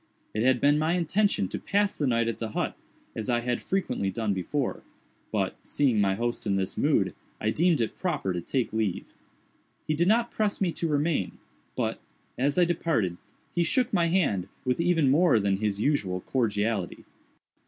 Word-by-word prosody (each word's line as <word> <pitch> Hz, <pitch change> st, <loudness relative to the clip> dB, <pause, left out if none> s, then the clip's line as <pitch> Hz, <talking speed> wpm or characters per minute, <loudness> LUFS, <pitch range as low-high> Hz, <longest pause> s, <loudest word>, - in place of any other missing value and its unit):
It 110 Hz, -, -1 dB
had 130 Hz, +1 st, +3 dB
been 145 Hz, +3 st, +4 dB
my 160 Hz, +2 st, +1 dB
intention 180 Hz, -, +1 dB
to -, -, -4 dB
pass 205 Hz, 0 st, +1 dB
the 145 Hz, -, 0 dB
night 115 Hz, -2 st, +2 dB
at 115 Hz, -, -3 dB
the 110 Hz, -2 st, -4 dB
hut, -, -, -1 dB, 0.4 s
as 110 Hz, 0 st, -4 dB
I 120 Hz, -1 st, +2 dB
had 120 Hz, 0 st, -1 dB
frequently 185 Hz, -, -1 dB
done 105 Hz, +1 st, -1 dB
before, 125 Hz, +9 st, -2 dB, 0.5 s
but, -, -, 0 dB
seeing 125 Hz, -7 st, +2 dB
my 95 Hz, -1 st, +2 dB
host 120 Hz, 0 st, -2 dB
in 100 Hz, -, +2 dB
this 95 Hz, -1 st, -1 dB
mood, -, -, +2 dB, 0.3 s
I 110 Hz, -, 0 dB
deemed 165 Hz, -1 st, +2 dB
it 115 Hz, -, -2 dB
proper 150 Hz, -, -1 dB
to 90 Hz, -, -3 dB
take 125 Hz, +6 st, -2 dB
leave. 110 Hz, -5 st, -2 dB, 0.7 s
He 155 Hz, -, 0 dB
did 170 Hz, +3 st, +1 dB
not 230 Hz, +3 st, +3 dB
press 210 Hz, -2 st, 0 dB
me 185 Hz, -3 st, +1 dB
to 165 Hz, -, -2 dB
remain, 150 Hz, -, 0 dB, 0.4 s
but, -, -, -2 dB, 0.3 s
as 140 Hz, +5 st, 0 dB
I 180 Hz, -, +6 dB
departed, 155 Hz, -, 0 dB, 0.4 s
he 175 Hz, -, +1 dB
shook 240 Hz, +9 st, +1 dB
my 170 Hz, -3 st, +3 dB
hand 165 Hz, -, +1 dB, 0.2 s
with 130 Hz, +5 st, +1 dB
even 165 Hz, -6 st, +3 dB
more 155 Hz, -5 st, +5 dB
than 100 Hz, -1 st, +1 dB
his 105 Hz, -1 st, -1 dB
usual 105 Hz, -9 st, 0 dB
cordiality. 105 Hz, -5 st, -1 dB
130 Hz, 185 wpm, -27 LUFS, 105-170 Hz, 0.7 s, I